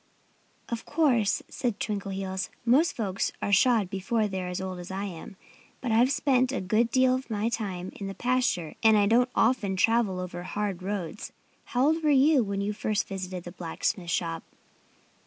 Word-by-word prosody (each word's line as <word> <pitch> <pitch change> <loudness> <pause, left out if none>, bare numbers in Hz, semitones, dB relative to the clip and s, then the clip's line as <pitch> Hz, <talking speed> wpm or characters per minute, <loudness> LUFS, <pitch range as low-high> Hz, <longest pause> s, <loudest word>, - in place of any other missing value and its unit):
"Of 235 -1 -3
course," 245 -11 +2
said 240 -5 -3
Twinkleheels, 195 -2 -3 0.2
"most 275 +8 +4
folks 195 -4 -1
are 200 - -2
shod 220 0 +4
before 210 +4 -1
they're 190 -2 -4
as 180 0 -3
old 185 -1 -5
as 175 - -8
I 190 +1 -3
am. 180 -1 -8 0.4
But 245 - -3
I've 240 +4 +4
spent 265 -3 +2
a 270 - -1
good 215 +5 +1
deal 255 +1 +4
of 260 0 -3
my 215 +1 0
time 190 -6 -4
in 200 - -6
the 195 - -6
pasture 245 -10 0
and 220 -2 +6
I 205 - +4
don't 240 +4 +3
often 225 -5 +2
travel 220 -2 +2
over 180 -1 -5
hard 195 0 -3
roads.... 190 -1 -4 0.3
How 250 +2 +1
old 320 +2 +2
were 305 - +2
you 285 0 +5
when 200 -1 -2
you 205 +1 -1
first 210 -1 -1
visited 185 -2 -5
the 175 - -8
blacksmith's 175 +1 -3
shop?" 165 -2 -1
205 Hz, 180 wpm, -27 LUFS, 190-245 Hz, 0.4 s, and